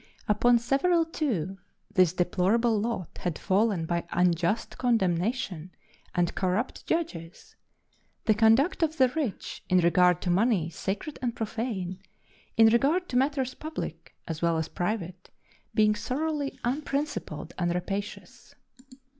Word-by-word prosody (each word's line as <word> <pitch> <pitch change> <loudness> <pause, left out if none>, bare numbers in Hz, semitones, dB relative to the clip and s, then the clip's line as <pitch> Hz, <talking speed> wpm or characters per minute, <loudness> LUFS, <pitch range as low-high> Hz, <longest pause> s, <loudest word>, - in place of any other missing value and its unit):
Upon 240 +3 +4
several, 325 +8 +2
too, 195 - -2 0.3
this 185 -3 +5
deplorable 195 +6 +2
lot 210 -6 -4
had 175 -4 -2
fallen 195 -3 +1
by 170 +1 -2
unjust 175 +4 +1
condemnation 190 -5 0 0.5
and 175 -1 +1
corrupt 190 +6 -2
judges; 185 - -3 0.7
the 220 - +5
conduct 225 - +3
of 320 0 +1
the 260 -1 +5
rich, 270 -7 -4
in 185 - +4
regard 180 0 +4
to 180 - +1
money 190 -4 +2
sacred 200 - -4
and 240 -2 -1
profane, 215 -5 -3 0.6
in 225 - +8
regard 295 +11 +2
to - - -4
matters 265 0 +1
public 310 +1 -7
as 160 -2 -4
well 170 -1 +2
as 160 - -2
private, 180 -1 -3 0.5
being 215 -1 +4
thoroughly 280 +5 -2
unprincipled 275 - -3
and 175 0 0
rapacious. 195 +3 -5
215 Hz, 125 wpm, -28 LUFS, 180-255 Hz, 0.7 s, in